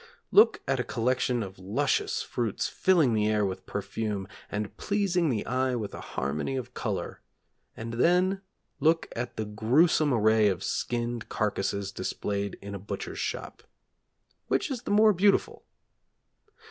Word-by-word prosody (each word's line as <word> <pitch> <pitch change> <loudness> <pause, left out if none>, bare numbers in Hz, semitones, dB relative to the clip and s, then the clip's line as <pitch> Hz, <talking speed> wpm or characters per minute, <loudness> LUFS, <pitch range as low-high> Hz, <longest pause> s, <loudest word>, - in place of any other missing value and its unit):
Look 425 +3 +6
at - - +1
a - - +1
collection 125 0 0
of 95 -1 -9
luscious 95 +2 0
fruits 115 -5 -2
filling 165 -10 +3
the 105 -1 +2
air 105 -1 +2
with 95 -1 -5
perfume, 100 0 -3 0.2
and 105 0 -4
pleasing 190 -5 +1
the 110 -5 -1
eye 130 +1 0
with 105 -4 -4
a - - -7
harmony 75 - -3
of 125 -1 -5
colour, 100 -6 -4 0.6
and 115 +1 -5
then 180 +9 +3 0.4
look 160 +1 +3
at 120 +1 -4
the 110 - -1
gruesome 135 +9 +3
array 110 -2 +4
of 95 -2 -1
skinned 120 -1 -2
carcasses 100 -2 -1
displayed 100 +1 -3
in 100 0 -6
a 100 - -5
butcher's 385 - -6
shop; - - -4 0.9
which 305 - 0
is 250 -4 -3
the - - -7
more 215 +1 +6
beautiful? 200 +2 +2
115 Hz, 145 wpm, -28 LUFS, 100-160 Hz, 0.9 s, Look